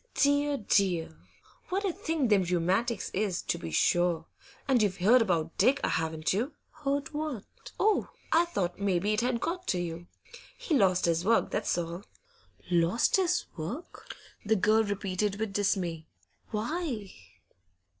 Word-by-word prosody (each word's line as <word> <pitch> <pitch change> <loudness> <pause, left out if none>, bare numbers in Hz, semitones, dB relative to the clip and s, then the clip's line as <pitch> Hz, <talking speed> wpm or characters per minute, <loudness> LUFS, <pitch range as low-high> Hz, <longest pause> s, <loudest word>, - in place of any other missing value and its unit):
'Dear, 285 0 +2
dear! 185 - +1 0.5
what 390 +3 -1
a 375 - 0
thing 325 - -1
them 205 -2 +5
rheumatics 185 +6 0
is, 195 -3 -1
to - - -2
be 80 - -6
sure! 170 - +2 0.4
And 260 -4 +3
you've 200 -3 +1
heard 225 +7 +5
about 165 -6 0
Dick, 270 - +4
haven't 160 0 -1
you?' 245 +10 -1 0.2
'Heard 285 0 -3
what?' 295 -8 -6
'Oh, 430 0 +2 0.2
I 335 +2 +5
thought 190 - -2
maybe 200 +1 +1
it 215 - +1
had 245 -1 0
got 360 +7 -3
to 180 - +1
you. 175 0 -5 0.5
He's - - -1
lost 185 -3 +3
his 170 0 +1
work, 225 +4 +2
that's - - 0
all.' 170 +2 -4 0.7
'Lost 175 - +3
his 360 -2 +1
work?' 200 - -7 0.3
the 220 +1 +2
girl 215 +3 +3
repeated, 200 0 -2
with 220 -2 -2
dismay. 180 -5 -1 0.4
'Why? 230 - -3
205 Hz, 145 wpm, -29 LUFS, 175-280 Hz, 0.7 s, them